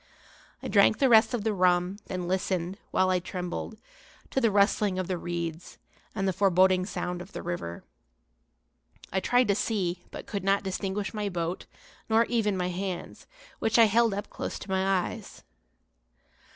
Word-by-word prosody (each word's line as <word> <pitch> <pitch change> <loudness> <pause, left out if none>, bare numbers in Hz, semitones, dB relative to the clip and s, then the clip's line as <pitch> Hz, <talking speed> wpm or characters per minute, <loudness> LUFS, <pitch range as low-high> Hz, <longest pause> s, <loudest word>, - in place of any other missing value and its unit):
I - - -3
drank 205 +1 +4
the 270 +1 +3
rest 225 +1 +6
of 220 - -3
the 220 -1 +1
rum, 180 +1 +2
then 180 -2 -4
listened, 185 0 -1
while 185 0 +2
I 185 - +2
trembled, 180 +4 -5 0.5
to 265 - +1
the 230 - +4
rustling 200 -1 +2
of 185 -1 -2
the 185 - -1
reeds 170 -1 -5 0.4
and 195 -2 0
the 190 - +1
foreboding 185 -1 +3
sound 180 -3 -4
of 185 +3 -11
the - - -6
river. 170 - -5 1.3
I 190 - +2
tried 245 +5 +3
to - - +5
see, 185 -4 -1
but - - -8
could 200 -2 -4
not 195 +1 +2
distinguish 195 +2 -3
my 210 -2 -2
boat, 175 -1 -3 0.4
nor 225 +1 +4
even 215 -5 0
my 180 0 -1
hands, 185 0 -5 0.3
which 225 - +1
I 230 - +8
held 225 0 +3
up 205 +1 -4
close - - -5
to 190 - -8
my 190 0 +1 0.3
eyes. - - -11
190 Hz, 170 wpm, -28 LUFS, 180-210 Hz, 1.3 s, I